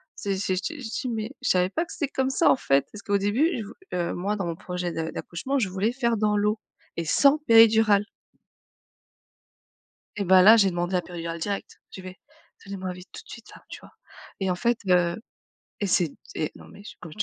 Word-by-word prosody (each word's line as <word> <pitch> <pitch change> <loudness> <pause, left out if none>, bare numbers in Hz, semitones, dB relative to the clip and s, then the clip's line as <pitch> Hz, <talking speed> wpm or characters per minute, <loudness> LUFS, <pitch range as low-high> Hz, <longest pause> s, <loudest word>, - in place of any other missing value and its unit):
c'est 195 -1 -3
c'est 190 -1 -1
j 185 - -2
te 325 - -4
j 290 - -10
je 225 - -5
dis: 255 - -3
«Mais 220 +1 -4
je 250 - -1
savais 180 0 +3
pas 330 - -1
que - - -14
c'était 290 - -2
comme 265 0 0
ça 300 +5 +3
en - - +4
fait». 140 - +1
Parce 210 - -10
qu'au 200 0 0
début, 215 - +1
je 220 - -4
vou 210 +4 -11 0.2
heu, 175 -1 -1
moi 200 +4 -2
dans 195 -3 -3
mon 170 -1 -3
projet 180 0 -4
de 160 0 -3
d'accouchement, 265 +11 -4
je 205 -7 0
voulais 195 +5 0
faire 235 -3 0
dans 210 0 +1
l'eau 210 +1 0 0.4
et 170 - -3
sans 280 - +4
péridurale. 225 -5 +5 2.1
Et 200 - -1
ben 185 0 +6
là 215 +5 +8
j'ai 195 -3 +4
demandé 175 +1 -2
la 180 - +1
péridurale 170 -1 -6
directe. 200 +4 -5
J'ai - - -9
fait: 185 0 -9 0.5
«Donnez 200 0 -6
moi 185 -1 -4
vite 180 +1 -13
tout - - -10
de - - -24
suite - - -12
là», - - -15
tu - - -9
vois. - - -17 0.5
Et 190 - 0
en 180 - +1
fait, 235 +5 0
heu, 175 -1 +3 0.6
et 205 - 0
c'est 175 -2 +2
d - - -19 0.2
et 155 - -2
non - - -14
mais 200 - -14 0.2
comme 160 -3 -10
je 210 - -14
200 Hz, 235 wpm, -25 LUFS, 180-225 Hz, 2.1 s, là